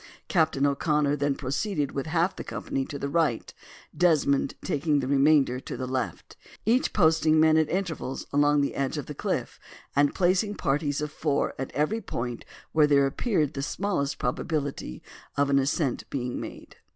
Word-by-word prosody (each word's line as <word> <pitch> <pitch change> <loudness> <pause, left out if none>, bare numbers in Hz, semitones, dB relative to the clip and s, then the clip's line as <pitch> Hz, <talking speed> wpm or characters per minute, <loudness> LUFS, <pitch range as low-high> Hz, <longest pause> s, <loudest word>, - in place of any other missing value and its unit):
Captain 160 -5 +2
O'Connor 145 +1 +1
then 145 0 0
proceeded 145 +2 -2
with 140 +2 -4
half 170 +3 +1
the - - -6
company 135 - -3
to 145 - -6
the 140 - -3
right, 145 -6 0 0.4
Desmond 150 -6 +2
taking 145 0 +1
the 135 - -2
remainder 140 -1 +3
to - - -7
the 130 - -3
left; 130 -2 -4 0.3
each 240 +4 +2
posting 160 -3 +3
men 155 0 +5
at 160 -1 +3
intervals 170 -8 -3
along 145 0 +4
the 140 - -1
edge 140 +2 -2
of 145 - -4
the 150 - -7
cliff, - - -3 0.4
and 145 0 +3
placing 190 +3 +2
parties 145 -2 0
of 150 0 -3
four 150 -2 0
at 135 - -4
every 195 +10 0
point 120 - -5 0.3
where 155 -1 +4
there 140 -1 +4
appeared 155 - 0
the 135 - -4
smallest 145 -3 -1
probability 140 - -3 0.3
of 140 0 +2
an 140 - +5
ascent 135 -1 -1
being 125 -3 -3
made. - - -10
145 Hz, 170 wpm, -27 LUFS, 140-160 Hz, 0.4 s, men